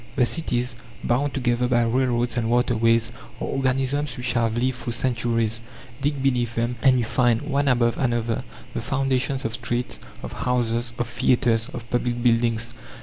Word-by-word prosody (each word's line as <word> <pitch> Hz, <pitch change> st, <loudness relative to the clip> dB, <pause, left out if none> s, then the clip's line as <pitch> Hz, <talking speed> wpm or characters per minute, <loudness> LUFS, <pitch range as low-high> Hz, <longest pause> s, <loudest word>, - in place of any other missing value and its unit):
The 130 Hz, -4 st, +4 dB
cities, 125 Hz, -4 st, -1 dB, 0.3 s
bound 140 Hz, +4 st, 0 dB
together 125 Hz, -2 st, +1 dB
by 120 Hz, -1 st, +3 dB
railroads 120 Hz, -1 st, +1 dB
and 115 Hz, -2 st, 0 dB
waterways, 115 Hz, -1 st, +2 dB, 0.3 s
are -, -, -2 dB
organisms 135 Hz, +1 st, 0 dB
which 125 Hz, -1 st, 0 dB
have 115 Hz, -1 st, +1 dB
lived 130 Hz, +1 st, 0 dB
through 120 Hz, -, -3 dB
centuries. 115 Hz, -2 st, 0 dB, 0.4 s
Dig 140 Hz, -1 st, -1 dB
beneath 120 Hz, -4 st, +1 dB
them 115 Hz, +1 st, 0 dB
and 130 Hz, -2 st, +5 dB
you 120 Hz, -, +1 dB
find, 120 Hz, 0 st, +2 dB
one 140 Hz, -1 st, 0 dB
above 120 Hz, -3 st, +2 dB
another, 120 Hz, -3 st, 0 dB, 0.3 s
the -, -, -2 dB
foundations 135 Hz, 0 st, 0 dB
of 115 Hz, -, -2 dB
streets, 120 Hz, 0 st, -2 dB, 0.2 s
of -, -, -6 dB
houses, 120 Hz, -1 st, 0 dB
of 120 Hz, -, 0 dB
theatres, 120 Hz, -1 st, +2 dB
of 115 Hz, -2 st, -7 dB
public 120 Hz, 0 st, 0 dB
buildings. 115 Hz, -1 st, +2 dB
120 Hz, 160 wpm, -24 LUFS, 115-130 Hz, 0.4 s, and